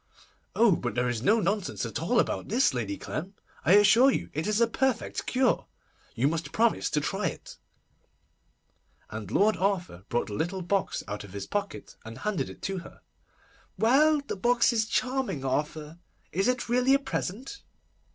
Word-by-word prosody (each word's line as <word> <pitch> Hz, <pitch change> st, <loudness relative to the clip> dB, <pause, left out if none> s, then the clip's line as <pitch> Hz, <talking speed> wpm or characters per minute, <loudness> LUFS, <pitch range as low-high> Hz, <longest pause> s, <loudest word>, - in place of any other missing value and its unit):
'Oh, 230 Hz, -2 st, +5 dB
but 120 Hz, -5 st, -4 dB
there 125 Hz, +1 st, +1 dB
is 120 Hz, -3 st, -2 dB
no 215 Hz, -, +3 dB
nonsense 195 Hz, -, -1 dB
at 115 Hz, +3 st, -4 dB
all 235 Hz, +9 st, +2 dB
about -, -, -1 dB
this, 240 Hz, -, +2 dB
Lady 110 Hz, -5 st, -3 dB
Clem! 185 Hz, +6 st, -6 dB, 0.3 s
I 180 Hz, -, +4 dB
assure 225 Hz, +6 st, +7 dB
you -, -, -2 dB
it 155 Hz, +5 st, -2 dB
is 215 Hz, +1 st, +1 dB
a 235 Hz, -, +5 dB
perfect 260 Hz, +2 st, -1 dB
cure. 255 Hz, -1 st, +1 dB, 0.5 s
You 130 Hz, +4 st, +2 dB
must 160 Hz, -1 st, -2 dB
promise 230 Hz, 0 st, +2 dB
to 150 Hz, -, +1 dB
try 195 Hz, +7 st, -1 dB
it'; -, -, -8 dB, 1.5 s
and -, -, -6 dB
Lord 215 Hz, +2 st, +3 dB
Arthur 180 Hz, -, -2 dB
brought 120 Hz, -, 0 dB
the 105 Hz, -, -8 dB
little 175 Hz, -, -2 dB
box 195 Hz, +2 st, -1 dB
out 105 Hz, 0 st, -5 dB
of 100 Hz, -2 st, -12 dB
his 100 Hz, -1 st, -5 dB
pocket, 200 Hz, -, -4 dB
and 115 Hz, +1 st, -9 dB
handed 210 Hz, -2 st, -2 dB
it -, -, -13 dB
to 195 Hz, -1 st, -2 dB
her. 170 Hz, -, -13 dB, 0.8 s
'Well, 290 Hz, +6 st, +4 dB
the 280 Hz, -, -5 dB
box 240 Hz, +4 st, +3 dB
is 220 Hz, -1 st, +1 dB
charming, 255 Hz, -, -1 dB
Arthur. 150 Hz, +4 st, -3 dB, 0.3 s
Is 195 Hz, +4 st, 0 dB
it 250 Hz, 0 st, 0 dB
really 250 Hz, +3 st, +3 dB
a -, -, +2 dB
present? 270 Hz, -, -5 dB
200 Hz, 175 wpm, -28 LUFS, 150-240 Hz, 1.5 s, assure